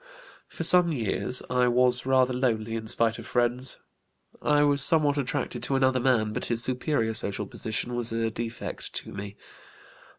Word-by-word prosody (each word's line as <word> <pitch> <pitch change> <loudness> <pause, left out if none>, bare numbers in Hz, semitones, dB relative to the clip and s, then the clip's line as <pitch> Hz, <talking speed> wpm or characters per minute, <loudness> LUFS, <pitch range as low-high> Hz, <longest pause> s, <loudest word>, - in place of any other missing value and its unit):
"For - - -7
some 180 -2 +7
years 125 -1 -2
I 125 0 +1
was 125 +1 +4
rather 130 -1 +2
lonely 115 -3 -2
in 110 -1 -5
spite 115 +1 0
of - - -10
friends. 125 +1 +1 0.6
I 150 0 +2
was 145 -1 +2
somewhat 145 -1 +2
attracted 135 0 -3
to 135 - -1
another 130 -1 +2
man, 120 -4 +1
but - - -4
his 120 0 -1
superior 125 -3 0
social 105 -2 -1
position 110 +4 -5
was 120 -1 -3
a 115 0 -2
defect 115 +1 -7
to - - -6
me. 100 +1 -8
125 Hz, 165 wpm, -26 LUFS, 115-130 Hz, 0.6 s, some